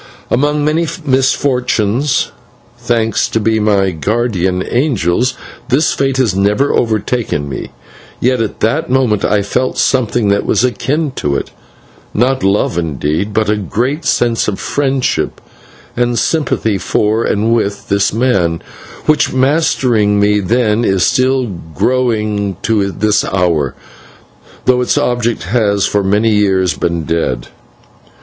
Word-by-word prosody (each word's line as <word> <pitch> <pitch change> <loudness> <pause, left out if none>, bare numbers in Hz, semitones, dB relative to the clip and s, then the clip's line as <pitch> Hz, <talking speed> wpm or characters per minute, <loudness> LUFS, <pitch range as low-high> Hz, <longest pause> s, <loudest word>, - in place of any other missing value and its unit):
Among 145 +3 +1
many 160 +2 +1 0.2
misfortunes, 130 -2 +1 0.5
thanks 115 -2 0
be 110 0 0
to - - 0
my 100 -3 +2
guardian 95 0 -1
angels, 125 - 0 0.3
this 140 +5 +2
fate 135 -1 0
has 125 -7 +2
never 105 +8 +1
overtaken 110 -8 -1
me, 70 - -6 0.5
yet 125 -1 +1
at 110 - -4
that 140 +8 0
moment 125 -6 +1
I 105 -1 +2
felt 125 +6 -1
something 120 -4 +1
that 100 0 +2
was - - +1
akin 140 +5 -1
to 70 -1 -1
it - - -3 0.6
not 130 +4 +1
love, 95 -3 +1
indeed, 80 - -2
but 110 0 0
a 105 - +2
great 125 - -2
sense 120 -1 +1
of 100 -2 -2
friendship 135 -2 -1 0.6
and 120 0 0
sympathy 115 -11 0
for 110 +4 0
and 110 +3 +1
with 105 -3 -2
this 100 0 +2
man, 100 -8 0 0.4
which, 155 - +2
mastering 130 -7 +2
me 105 0 +3
then, 110 +2 +1
is 95 -5 +2
still 130 0 +2 0.3
growing 105 - 0
to 100 -3 +1
this 105 +2 +1
hour, 85 -8 0 0.9
though 125 -1 +3
its 125 - 0
object 120 -2 0
has 100 0 +1
for 100 -1 0
many 105 +4 +2
years 95 -3 +2
been 85 -1 -2
dead. 70 -6 -2
110 Hz, 130 wpm, -14 LUFS, 100-125 Hz, 0.9 s, me